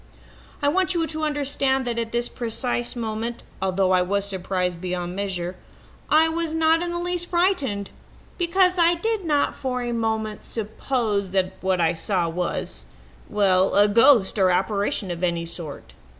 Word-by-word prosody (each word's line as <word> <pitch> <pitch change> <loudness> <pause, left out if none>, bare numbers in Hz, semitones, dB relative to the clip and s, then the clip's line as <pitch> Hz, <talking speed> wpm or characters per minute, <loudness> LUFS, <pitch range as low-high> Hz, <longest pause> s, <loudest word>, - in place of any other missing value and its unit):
"I - - +3
want 370 +4 +2
you 330 -1 +1
to 315 -1 -4
understand 280 -3 0
that 235 -1 -2
at 230 -1 -3
this 240 0 0
precise 240 +1 -2
moment, 230 0 -4 0.2
although 190 0 +1
I 185 -1 +4
was 200 +2 0
surprised 185 -2 -2
beyond 180 -1 -3
measure, 185 -2 -3 0.5
I 315 +1 +5
was 320 0 -2
not 320 +1 +3
in 350 - 0
the 345 - -2
least 350 0 -1
frightened, 345 - 0 0.5
because 365 +1 +3
I 340 0 +5
did 440 +3 -1
not 295 -3 +1
for 250 -2 -3
a 240 - -2
moment 220 -2 -2
suppose 220 -2 -2
that 185 0 +1
what 185 -1 +1
I 165 0 +3
saw 175 +1 0
was 165 - -3 0.4
well, 190 -2 +3
a 205 +1 +6
ghost 225 -1 +5
or 190 -1 +5
apparition 195 +1 0
of 175 +1 -5
any 170 -1 0
sort. 155 - -9
220 Hz, 165 wpm, -24 LUFS, 185-295 Hz, 0.5 s, a